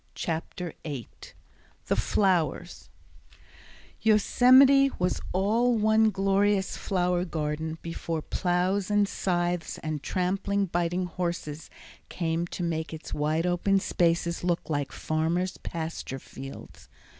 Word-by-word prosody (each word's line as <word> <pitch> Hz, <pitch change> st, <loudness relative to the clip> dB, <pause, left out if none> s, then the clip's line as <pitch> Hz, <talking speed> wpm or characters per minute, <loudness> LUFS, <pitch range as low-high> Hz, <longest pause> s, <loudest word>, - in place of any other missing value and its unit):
Chapter 165 Hz, +1 st, -4 dB
8 140 Hz, -8 st, -8 dB, 0.5 s
The -, -, +1 dB
Flowers 175 Hz, -3 st, 0 dB, 1.1 s
Yosemite 255 Hz, +6 st, +6 dB
was 180 Hz, 0 st, 0 dB
all 225 Hz, +6 st, +2 dB
one 220 Hz, +1 st, +4 dB
glorious 195 Hz, 0 st, +1 dB
flower 180 Hz, -2 st, 0 dB
garden 160 Hz, -1 st, -3 dB
before 165 Hz, -1 st, -4 dB
plows 185 Hz, +2 st, 0 dB
and 205 Hz, -1 st, +3 dB
scythes 175 Hz, -3 st, -1 dB
and 155 Hz, -2 st, -3 dB
trampling, 195 Hz, +4 st, 0 dB
biting 175 Hz, +1 st, -1 dB
horses 170 Hz, -4 st, -4 dB, 0.4 s
came 165 Hz, 0 st, -1 dB
to 175 Hz, -, -5 dB
make 160 Hz, -1 st, -2 dB
its 155 Hz, -, -8 dB
wide 155 Hz, +3 st, 0 dB
open 180 Hz, +2 st, +2 dB
spaces 170 Hz, -2 st, 0 dB
look 175 Hz, -2 st, -1 dB
like 145 Hz, -2 st, -1 dB
farmers' 170 Hz, +4 st, -1 dB
pasture 160 Hz, -5 st, -5 dB
fields. 135 Hz, +1 st, -11 dB
175 Hz, 110 wpm, -27 LUFS, 160-195 Hz, 1.1 s, Yosemite